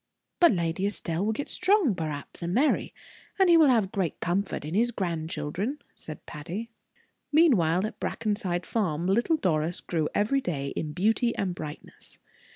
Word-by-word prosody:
"But 345 - +7
Lady 170 +2 0
Estelle 175 -3 -2
will 215 - +1
get 285 +6 -4
strong, 370 - +3
perhaps, 155 -4 -4
and 175 +2 -2
marry, 285 +5 +2 0.5
and 380 -2 +4
he - - +8
will 320 -3 +7
have 225 -7 +3
great 185 -5 -2
comfort 180 -3 -1
in 155 - -5
his 230 +5 +3
grandchildren," 170 - -3 0.2
said 155 - -9
Patty. 175 +10 -6 0.6
Meanwhile, 205 - +4
at 215 - -6
Brackenside 205 -6 -2
Farm, 175 -7 -1
little 235 - +2
Doris 165 - 0
grew 160 -3 -2
every 245 +7 +2
day 140 - -3
in 150 +1 -4
beauty 225 +6 +1
and 185 -3 -1
brightness. 155 -4 -9
190 Hz, 160 wpm, -27 LUFS, 165-235 Hz, 0.6 s, he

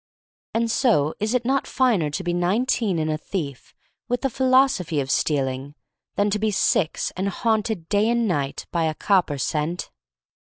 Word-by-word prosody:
And 230 0 +1
so, 160 - +2
is 220 +4 0
it 245 -1 0
not 270 +1 +1
finer 225 - +2
to 145 +6 -4
be 175 -1 -1
nineteen 195 +2 +1
and 155 -1 0
a 155 - -2
thief, 145 - -6 0.3
with 245 0 0
the 270 - 0
philosophy 255 - +2
of 135 -1 -2
stealing 135 -1 -1 0.2
— - - -61
than 205 0 +1
to 210 - 0
be 215 +1 +1
six 190 -4 +1
and 190 +2 -1
haunted 220 -4 -1
day 205 +3 +2
and 235 -1 +1
night 140 -7 -2
by 170 -2 +1
a 155 -1 -1
copper 180 -7 +1
cent? 155 +5 -2
190 Hz, 180 wpm, -23 LUFS, 155-230 Hz, 0.3 s, so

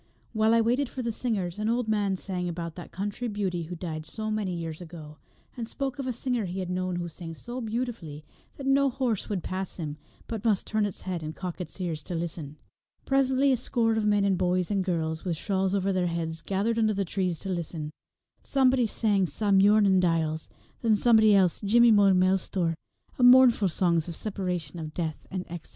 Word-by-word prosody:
While 220 +1 +3
I 230 - +5
waited 245 +4 +1
for 255 - -5
the 235 - -1
singers 210 -6 -2
an 215 +1 0
old 240 0 0
man 205 -3 +1
sang 180 -2 -3
about 170 -1 -5
that 175 +1 -10
country 205 +5 -3
beauty 190 -6 -2
who 175 +2 -6
died 160 -2 -5
so 215 -1 -4
many 205 -4 -1
years 165 -1 -5
ago, 160 -3 -10 0.4
and 235 -2 -5
spoke 275 +2 -4
of 270 - -3
a - - 0
singer 245 -2 -1
he 180 +1 -5
had 185 -1 -3
known 185 0 -1
who 175 0 -3
sang 165 0 -8
so 245 +8 -6
beautifully 220 -10 -4 0.3
that 275 - -7
no 275 +1 +4
horse 245 -5 -2
would 195 -5 -2
pass 190 0 -4
him, 155 -4 -5 0.3
but 225 -3 -5
must 215 -5 +2
turn 215 -1 0
its 195 - -8
head 180 -3 -4
and 155 +1 -6
cock 180 -1 -5
its 180 - -7
ears 165 -4 -3
to 175 - -4
listen. 160 -3 -5 0.5
Presently 270 0 +3
a 255 - +3
score 230 -1 +1
of 215 -1 0
men 205 -1 +3
and 190 -2 +1
boys 180 +1 +1
and 195 -2 +1
girls, 160 -3 -2
with 175 -4 -2
shawls 190 +1 0
over 195 0 +1
their 180 -1 +1
heads, 165 -1 -3
gathered 210 +4 0
under 215 -2 +2
the 195 0 0
trees 180 -1 -1
to 195 - -7
listen. 165 -4 -4 0.5
Somebody 260 -3 +3
sang 205 -4 +1
Sa 200 +7 -1
Muirnin 200 0 +5
Diles, 160 -3 0 0.3
and 230 -2 +3
then - - +5
somebody 220 -2 +5
else 185 -3 +3
Jimmy 235 +3 +5
Mo 205 -2 +6
Milestor, 185 -2 +1 0.5
mournful 245 -5 +7
songs 170 -1 +1
of 170 - -5
separation, 180 -6 -4
of 155 -1 -7
death, 160 -3 -4
and 185 -1 -3
of - - -18
exile. 175 -2 -7
190 Hz, 210 wpm, -27 LUFS, 170-225 Hz, 0.5 s, mournful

